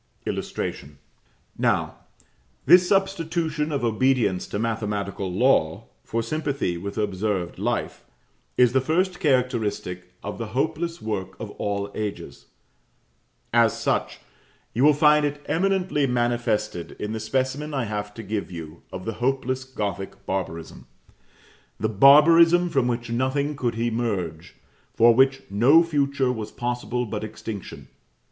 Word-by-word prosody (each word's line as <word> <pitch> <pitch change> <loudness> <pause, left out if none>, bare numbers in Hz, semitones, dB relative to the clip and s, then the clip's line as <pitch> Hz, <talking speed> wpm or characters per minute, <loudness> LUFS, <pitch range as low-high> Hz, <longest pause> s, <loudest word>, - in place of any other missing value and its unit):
Now, - - +1 0.7
this 180 0 +6
substitution 165 -5 0
of 140 -4 -2
obedience 115 -4 +1
to - - -4
mathematical 105 -4 -2
law 90 -6 +2
for 115 0 -2
sympathy 140 - -2
with 100 +5 -6
observed 100 -3 -2
life, - - -2 0.5
is 125 -1 +5
the 130 - +3
first 175 +6 0
characteristic 115 - -1
of 105 - -6
the 115 - -3
hopeless 160 +2 -1
work 105 -4 -4
of - - -6
all 100 0 -3
ages; 105 -2 -6 1.1
as - - +3
such, - - -1 0.6
you 120 - +1
will 150 0 +6
find 150 0 +5
it 145 0 -3
eminently 185 -5 +1
manifested 120 -6 -1
in 105 - -5
the 110 - -3
specimen 130 +6 -2
I 135 -3 -1
have 105 -1 -4
to 115 - -7
give 105 -1 -3
you 80 -1 -8
of 95 - -7
the 115 - -2
hopeless 130 0 0
Gothic 105 -6 -5
barbarism; 85 -4 -5 0.9
the 110 - 0
barbarism 165 - +6
from 135 -6 +1
which 120 -1 -3
nothing 135 +4 0
could 120 -4 -2
emerge 105 -8 -2 0.4
for 115 +1 +6
which 135 +2 +3
no 130 +11 +6
future 140 -5 0
was 110 -4 -5
possible 125 0 -2
but 110 -1 -4
extinction. 110 -1 -7
120 Hz, 125 wpm, -24 LUFS, 105-145 Hz, 1.1 s, this